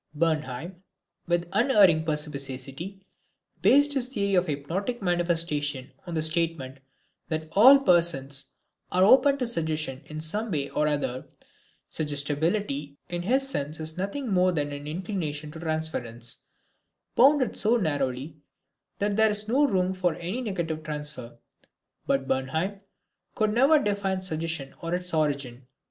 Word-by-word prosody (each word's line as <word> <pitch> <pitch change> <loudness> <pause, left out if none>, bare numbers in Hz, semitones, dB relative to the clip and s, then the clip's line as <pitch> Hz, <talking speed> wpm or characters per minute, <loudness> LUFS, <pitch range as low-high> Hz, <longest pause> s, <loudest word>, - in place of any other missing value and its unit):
Bernheim, 160 +2 -2 0.5
with 175 0 0
unerring 200 - +5
perspicacity, 150 +4 -5 0.6
based 285 +1 +5
his 260 -3 +1
theory 200 -6 -1
of 180 -1 +3
hypnotic 170 - -3
manifestations 165 -7 -1 0.2
on 170 - -4
the 155 - +1
statement 155 -5 -1 0.5
that 160 -1 -3
all 260 +7 +8
persons 170 - +2 0.5
are 185 +1 +3
open 275 +7 +6
to 255 - -1
suggestion 155 - -2
in 155 0 -7
some 205 +9 -2
way 145 -6 -2
or 150 - +1
other. 140 -4 -2 0.6
Suggestibility 145 0 -2
in 175 0 -3
his 260 +9 +1
sense 155 - -3
is 160 0 -4
nothing 200 +9 -3
more 185 0 +4
than 145 -4 -1
an 145 0 -7
inclination 155 -3 -4
to 160 - -9
transference, 155 -8 -2 0.7
bounded 270 0 +4
so 225 +3 +4
narrowly 145 - -2 0.6
that 205 0 0
there 220 +1 +5
is 210 0 +1
no 275 +6 +3
room 185 -5 +1
for 180 -3 0
any 185 +11 -4
negative 170 -8 -3
transfer. 150 -5 -4 0.7
But 135 -1 0
Bernheim 160 +10 -2 0.5
could 215 -1 +1
never 270 +7 +5
define 200 -7 -1
suggestion 160 -5 -3
or 170 +1 -2
its 180 -1 -3
origin. 140 -5 -1
165 Hz, 135 wpm, -26 LUFS, 145-200 Hz, 0.7 s, all